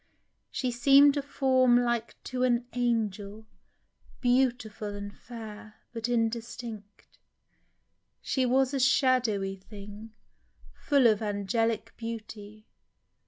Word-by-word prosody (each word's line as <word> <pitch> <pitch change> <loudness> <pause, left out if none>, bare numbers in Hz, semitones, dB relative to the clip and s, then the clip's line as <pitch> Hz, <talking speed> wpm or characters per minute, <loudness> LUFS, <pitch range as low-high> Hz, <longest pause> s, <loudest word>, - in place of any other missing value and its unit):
She 255 -2 -2
seem'd 275 +4 +6
a 285 - 0
form 260 -3 +3
Like 240 -1 -1
to 255 -1 -4
an 245 -1 +2
angel, 220 -3 -2 0.7
beautiful 245 -5 0
and 200 0 -7
fair. 215 -2 -10 0.2
But 230 0 -3
indistinct. 230 -2 -4 1.0
She 260 - -1
was 260 +2 +2
a 275 - 0
shadowy 245 -7 +2
thing, 205 +2 -11 0.7
Full 280 -4 +3
of 220 -2 +4
angelic 215 +2 -1
beauty 215 -2 -8
230 Hz, 100 wpm, -28 LUFS, 210-250 Hz, 1.0 s, seem'd